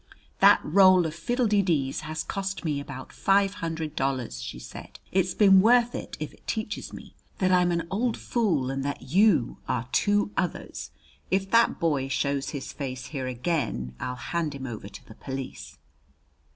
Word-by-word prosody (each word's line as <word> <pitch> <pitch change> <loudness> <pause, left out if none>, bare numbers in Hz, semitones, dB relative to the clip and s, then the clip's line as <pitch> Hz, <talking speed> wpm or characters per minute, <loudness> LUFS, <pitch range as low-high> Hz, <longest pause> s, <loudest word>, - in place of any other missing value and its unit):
"That - - +7
roll 185 +1 +6
of 160 - -3
fiddle 240 +10 -1
de 210 -2 +3
dees 150 -8 0
has 155 0 -4
cost 195 -3 -4
me 150 -3 0
about 140 -2 -8
five 195 0 +2
hundred 160 -2 -3
dollars," 130 - -2
she - - -6
said. 60 - -10
"It's 185 -1 +1
been 195 -3 +7
worth 240 +2 +4
it - - -6
if - - -5
it - - -23
teaches 220 -1 -3
me - - -11 0.2
that 185 -2 +2
I'm 180 -1 +4
an 170 -1 -1
old 225 +4 0
fool 165 - 0
and 135 0 -3
that 140 0 -4
you 190 - +4
are 125 -1 -1
two 205 0 +2
others! 180 -2 -3 0.4
If 195 +1 0
that 230 0 +4
boy 145 -5 +1
shows 140 0 -1
his 140 -3 -6
face 130 -3 -5
here 130 -3 -3
again, 125 - -2
I'll 125 0 -3
hand 155 +3 -3
him 135 -1 -6
over 110 -5 -6
to - - -12
the - - -11
police." 110 - -7
160 Hz, 180 wpm, -26 LUFS, 135-195 Hz, 0.4 s, That